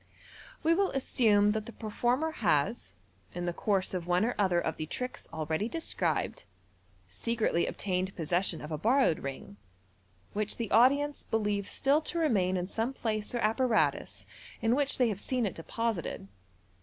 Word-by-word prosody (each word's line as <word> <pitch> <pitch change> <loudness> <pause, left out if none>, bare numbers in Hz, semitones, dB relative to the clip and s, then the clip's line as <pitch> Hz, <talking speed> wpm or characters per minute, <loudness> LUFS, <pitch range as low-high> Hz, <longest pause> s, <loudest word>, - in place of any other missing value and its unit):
We 325 +1 +4
will 390 +3 +2
assume 215 -6 +3
that 215 0 -3
the - - -7
performer 240 +8 -1
has, 210 - 0 0.4
in 175 0 -3
the 175 - -1
course 195 0 0
of 175 -2 -3
one 180 +4 +3
or 245 - 0
other 185 -4 +2
of 160 -2 -2
the 155 - -4
tricks 250 +9 -5
already 160 +6 -2
described, 330 +3 -1 0.6
secretly 225 -7 0
obtained 185 -1 -2
possession 175 +1 0
of 150 - -7
a 155 - -3
borrowed 235 - +3
ring, 135 -7 -7 0.8
which 215 0 -2
the 230 -2 -4
audience 280 +6 +4
believe 205 -2 -1
still 285 +3 +2
to 340 - -4
remain 195 - +2
in 180 - -1
some 225 +7 -2
place 215 -2 -2
or - - 0
apparatus 225 +2 +1 0.3
in 225 +1 +2
which 280 +1 0
they 250 -3 +3
have 200 -3 -3
seen 250 +2 -1
it 195 - -2
deposited. 200 - -3
215 Hz, 160 wpm, -30 LUFS, 180-250 Hz, 0.8 s, We